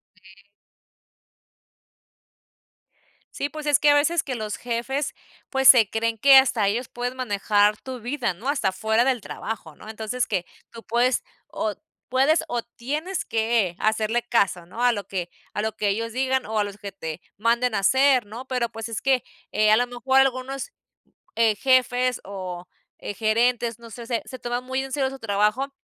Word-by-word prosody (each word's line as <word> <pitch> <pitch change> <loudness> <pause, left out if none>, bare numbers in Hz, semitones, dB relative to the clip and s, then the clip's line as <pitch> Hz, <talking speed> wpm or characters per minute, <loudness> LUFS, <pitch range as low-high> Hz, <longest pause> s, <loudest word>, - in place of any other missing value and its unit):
Sí. 195 +2 -21 2.8
Sí, 285 - -2
pues 305 0 -8
es 295 -2 +4
que 295 - +4
a - - +7
veces 310 +4 +2
que 260 - -4
los 215 -2 -4
jefes, 245 +4 -2 0.4
pues, 265 -1 +5
se 230 -6 +8
creen 225 0 -1
que 275 +5 +7
hasta 245 -6 +4
ellos 235 +5 -1
pueden 245 +1 -4
manejar 210 -3 +2
tu 255 0 -8
vida, 245 -2 -2
¿no?, 225 +10 -5
hasta 265 -10 0
fuera 220 +4 +1
del 260 -3 +1
trabajo, 200 -6 -6
¿no? - - -13
Entonces 220 +3 -3
que 180 - -1 0.2
tú 230 -1 -12
puedes 240 +2 +1 0.2
o 215 - -2 0.4
puedes 270 +6 +3
o 240 - -1
tienes 295 +11 -4
que 220 -5 0
hacerle 220 +2 +1
caso, 200 -7 +1
¿no?, 205 +8 -5
a 245 - +5
lo 205 -4 -4
que 180 -3 -4 0.2
a - - -1
lo 220 0 -3
que 210 - 0
ellos 230 +3 -1
digan 260 +1 0
o 220 0 -1
a 205 - +2
los 205 0 -8
que 200 -1 -7
te 160 -3 -7 0.2
manden 235 +3 +1
a 200 - +1
hacer, 260 +4 +4
¿no? 225 +5 -9
Pero, 250 -2 0
pues, 225 0 -7
es 225 - -4
que, 260 -2 +2 0.3
eh, 215 0 +4
a 215 - +6
lo 245 +1 +1
mejor 255 +2 +1
algunos, 270 - 0 0.6
eh, 225 -2 +3
jefes 255 +1 +2
o, 185 -2 -7 0.3
eh, 205 - -6
gerentes, 230 +1 +1
no 235 0 -12
sé, 235 +2 -9
se 235 -1 -1
se 255 - -8
toman 245 +1 -3
muy 260 +1 -2
en 270 - -8
serio 270 -2 +1
su 270 0 -8
trabajo, 215 +5 0
235 Hz, 185 wpm, -24 LUFS, 210-260 Hz, 2.8 s, se